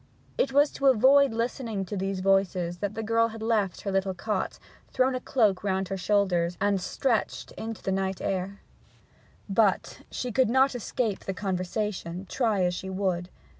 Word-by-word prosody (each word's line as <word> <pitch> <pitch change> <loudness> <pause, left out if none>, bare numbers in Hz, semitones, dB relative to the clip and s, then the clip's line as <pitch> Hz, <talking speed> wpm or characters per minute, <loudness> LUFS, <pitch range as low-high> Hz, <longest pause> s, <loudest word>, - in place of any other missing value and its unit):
It - - +1
was 285 +2 +4
to 275 - 0
avoid 270 +2 +6
listening 230 -3 -2
to 195 - -5
these 195 0 -2
voices 185 -3 +1
that 205 +2 -3
the 225 - -3
girl 230 +1 +3
had 225 -1 -8
left 215 -5 0
her 200 - -3
little 195 -1 0
cot, 205 +1 -2 0.3
thrown 260 +1 +2
a 255 - -1
cloak 215 -9 +1
round 190 -1 -1
her - - -2
head 195 - -3
and - - -7
shoulders, 180 -4 +1
and 200 -2 +1
stretched 230 +4 -1
into 225 -1 -7
the 190 - -1
night 190 0 -1
air. 195 +1 -3 0.9
But 200 -1 +1
she 250 - -4
could 255 0 +3
not 265 +3 +4
escape 230 -3 -2
the 195 - -3
conversation, 185 -1 -3
try 220 -6 +1
as 180 0 +1
she 190 +2 -5
would. 185 -2 -1
200 Hz, 180 wpm, -27 LUFS, 190-230 Hz, 0.9 s, avoid